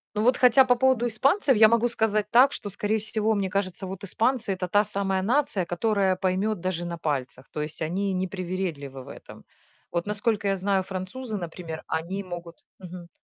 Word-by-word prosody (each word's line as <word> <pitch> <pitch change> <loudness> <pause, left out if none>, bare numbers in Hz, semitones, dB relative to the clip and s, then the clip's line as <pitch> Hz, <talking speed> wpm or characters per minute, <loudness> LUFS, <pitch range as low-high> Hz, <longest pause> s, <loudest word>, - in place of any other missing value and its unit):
Ну 210 - 0
вот 250 +2 +4
хотя 255 +1 +6
по 250 -1 +3
поводу 245 -1 +2
испанцев 270 - +2
я 220 - +8
могу 235 +2 +2
сказать 215 -2 0
так, 260 +4 +6
что, 205 - -6
скорее 210 +2 -1
всего, 220 0 0
мне 195 -2 -1
кажется, 190 0 -2
вот 195 +2 -7
испанцы- 225 +1 0
это 180 -1 -4
та 205 +3 +3
самая 195 -1 -1
нация, 225 -4 +1
которая 190 +2 +1
поймет 190 +2 -1
даже 175 -1 -2
на 170 0 -4
пальцах. 135 -5 -3
То 150 - -4
есть 150 +2 -6
они 190 +5 -1
не 185 0 0
привередливы 175 -8 -4
в - - -13
этом. - - -12 0.5
Вот 170 0 -1
насколько 210 0 0
я 195 - +2
знаю, 195 0 0
французы, 195 +6 -5
например, 165 -3 -6
они 185 +5 -3
могут 175 -2 -9 0.2
Мгм. 180 -2 -10
195 Hz, 190 wpm, -26 LUFS, 180-220 Hz, 0.5 s, я